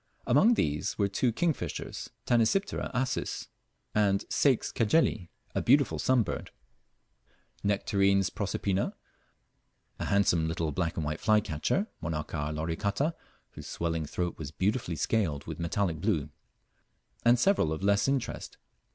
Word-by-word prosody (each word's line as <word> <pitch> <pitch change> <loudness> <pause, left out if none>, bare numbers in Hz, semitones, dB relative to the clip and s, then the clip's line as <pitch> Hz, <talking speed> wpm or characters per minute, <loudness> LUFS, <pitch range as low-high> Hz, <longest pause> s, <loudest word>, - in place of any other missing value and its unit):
Among 190 - +5
these 75 - -1
were 100 - +2
two 115 +5 +1
kingfishers, 140 - -2 0.2
Tanysiptera 120 - +1
acis 130 0 -2 0.4
and 100 -2 +2
Ceyx 135 -5 +2
Cajeli; 110 - +2 0.2
a - - 0
beautiful - - +3
sunbird, 125 -6 +1 1.2
Nectarines 100 -1 +2
proserpina; 100 -1 -1 1.0
a - - -2
handsome 90 -5 +2
little 80 -1 -1
black 85 +3 -1
and 80 - -1
white 75 +2 -3
flycatcher, 105 - +1 0.2
Monarcha 75 -1 -3
loricata, 100 - -1 0.4
whose - - -10
swelling 80 -2 -2
throat 90 +2 -3
was 75 -3 -5
beautifully 95 +2 -1
scaled 80 -4 0
with - - -6
metallic 85 -1 -1
blue; 80 -8 0 0.9
and 120 +1 +5
several 195 - +3
of 80 +3 -3
less 100 +3 +3
interest. 135 -3 -2
100 Hz, 120 wpm, -29 LUFS, 80-115 Hz, 1.2 s, Among